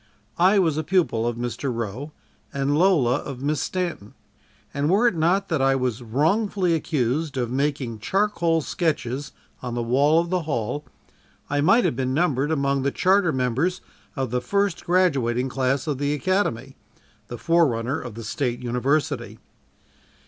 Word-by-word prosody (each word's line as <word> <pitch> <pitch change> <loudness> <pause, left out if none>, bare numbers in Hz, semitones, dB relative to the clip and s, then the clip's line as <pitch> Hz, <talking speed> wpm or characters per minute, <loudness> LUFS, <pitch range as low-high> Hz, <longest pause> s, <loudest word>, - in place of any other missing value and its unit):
I 190 +4 +5
was 165 -6 +2
a - - -1
pupil 160 -12 +1
of 120 - -1
Mr. 120 +3 -3
Roe 120 +5 -5 0.4
and 140 +1 0
Lola 150 -8 +3
of 135 -3 -7
Miss 150 +1 0
Stanton 175 - -4 0.6
and 140 +2 0
were 210 +7 +4
it 235 - +2
not 180 +5 +1
that 160 -6 0
I 135 0 +3
was 125 -3 -1
wrongfully 175 - +1
accused 145 -1 -1
of 120 -2 -1
making 135 -4 -2
charcoal 170 - +1
sketches 145 -5 -2 0.3
on 125 -2 -4
the 120 - -1
wall 140 +7 +3
of 170 +1 -2
the 185 -1 +1
hall, 145 -1 -3 0.7
I 145 0 +1
might 195 +11 +4
have - - +1
been 130 0 -1
numbered 145 -4 +1
among 140 -3 +1
the 140 - +1
charter 185 +3 +2
members 130 +8 0 0.4
of 130 -4 -2
the 125 0 0
first 200 +6 -1
graduating 135 -9 +1
class 135 +2 0
of 145 -4 -2
the 145 +1 0
Academy 135 - -1 0.5
the 120 - -7
forerunner 135 -7 +1
of 120 -4 -8
the 115 - -7
State 120 +2 -2
University. 125 -1 -1
140 Hz, 160 wpm, -24 LUFS, 125-170 Hz, 0.7 s, I